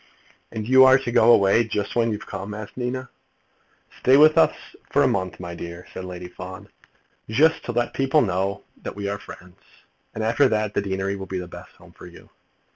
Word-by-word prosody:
"And 110 -1 -5
you 130 +1 +7
are 130 0 +7
to 135 -3 -4
go 115 0 +5
away 100 +1 +4
just 105 -2 -4
when 115 -1 +2
you've 105 - -5
come?" 105 +2 -6
asked 105 -1 -9
Nina. 125 +1 -4 0.9
"Stay 130 +2 +5
with 155 +1 +6
us - - +4 0.4
a - - +5
month, 95 -1 -2
my 85 -1 -7
dear," 85 +1 -8
said 95 - -7
Lady 90 -1 -7
Fawn, 95 +3 -10 0.6
"just 150 +9 +3
to - - -3
let 120 0 -1
people 135 +3 +2
know 95 +2 -2 0.2
that - - -7
we 100 0 -4
are 100 0 -3
friends, 90 +1 -13 0.6
and 110 - -3
after 115 +5 +3
that 105 -1 -1
the - - 0
deanery 95 0 -2
will 95 -1 -7
be 95 - -4
the 90 -1 -5
best - - -12
home - - -18
for - - -13
you." - - -16
105 Hz, 200 wpm, -23 LUFS, 95-120 Hz, 0.9 s, you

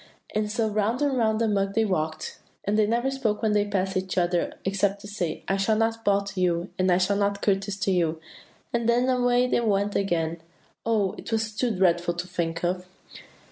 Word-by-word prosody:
And 210 0 0
so 225 0 +1
round 215 +5 0
and 280 -2 +1
round 220 -3 +2
the 230 - +2
mug 195 -1 0
they 225 0 +3
walked, 155 -5 -2 0.2
and 205 - 0
they 215 -1 +3
never 240 +4 +1
spoke 230 -5 -1
when 220 - +3
they 210 0 +3
went 205 0 -4
past 190 0 0
each 185 0 -2
other 175 -1 +1
except 195 +1 +1
to 205 - -9
say, 180 -6 -3
'I 195 - +1
shall 195 +3 +2
not 225 +1 0
bow 200 -1 +3
to 200 -2 -5
you,' 175 0 +1
and 185 0 +3
'I 175 - +5
shall 185 +2 +2
not 200 0 0
courtesy 195 0 0
to 195 - +1
you,' 165 -3 +1 0.5
and 235 -1 +1
then 245 +2 +3
away 245 -1 +3
they 250 - +1
went 205 -3 +1
again. 170 -4 0 0.5
Oh, 210 -4 +2
it - - -8
was 220 -1 -1
too 245 +3 +1
dreadful 175 -4 +2
to 175 +1 -3
think 170 -2 -3
of! 180 +1 -1
200 Hz, 220 wpm, -26 LUFS, 185-220 Hz, 0.5 s, I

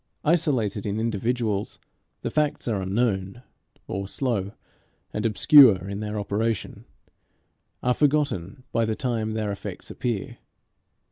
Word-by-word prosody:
Isolated 125 - +1
in 105 +2 -1
individuals, 115 -1 -1 0.5
the - - -2
facts 150 -3 0
are 105 -5 0
unknown; 100 +2 -1 0.4
or, 95 0 -3
slow 105 -4 -2 0.6
and 105 +2 0
obscure 110 - +7
in 100 0 -4
their 105 0 -3
operation, 105 +2 -2 1.0
are 125 - +3
forgotten 135 - 0
by 115 - +1
the 110 -1 0
time 110 -4 -2
their 110 -2 -1
effects 100 - -7
appear. 115 -5 -3
110 Hz, 120 wpm, -25 LUFS, 100-125 Hz, 1.0 s, obscure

